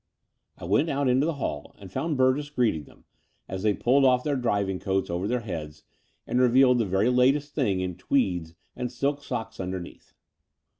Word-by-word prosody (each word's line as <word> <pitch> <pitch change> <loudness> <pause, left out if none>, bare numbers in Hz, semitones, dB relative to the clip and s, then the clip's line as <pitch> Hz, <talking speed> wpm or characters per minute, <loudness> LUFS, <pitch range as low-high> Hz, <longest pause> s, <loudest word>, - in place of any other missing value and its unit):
I - - -8
went 105 - +2
out 140 -1 0
into 130 +4 +3
the 165 - -1
hall 75 - -5
and 95 -3 -12
found 155 - -2
Burgess 130 +3 +2
greeting 120 - 0
them, - - -20 0.4
as 95 0 -5
they 105 -1 +2
pulled 135 +3 +3
off 125 -1 +4
their 145 -2 0
driving 100 -7 0
coats 95 -2 -1
over 90 +3 -2
their 125 +2 0
heads 80 -8 -7 0.4
and 125 - +1
revealed 125 0 +5
the 115 - +2
very 95 +4 +1
latest 135 +4 +2
things 100 -10 0
in 90 -1 -3
tweeds 90 -11 0 0.2
and 125 -1 -4
silk 140 +3 -1
socks 110 - -5
underneath. 90 -1 -7
120 Hz, 185 wpm, -26 LUFS, 95-135 Hz, 0.4 s, revealed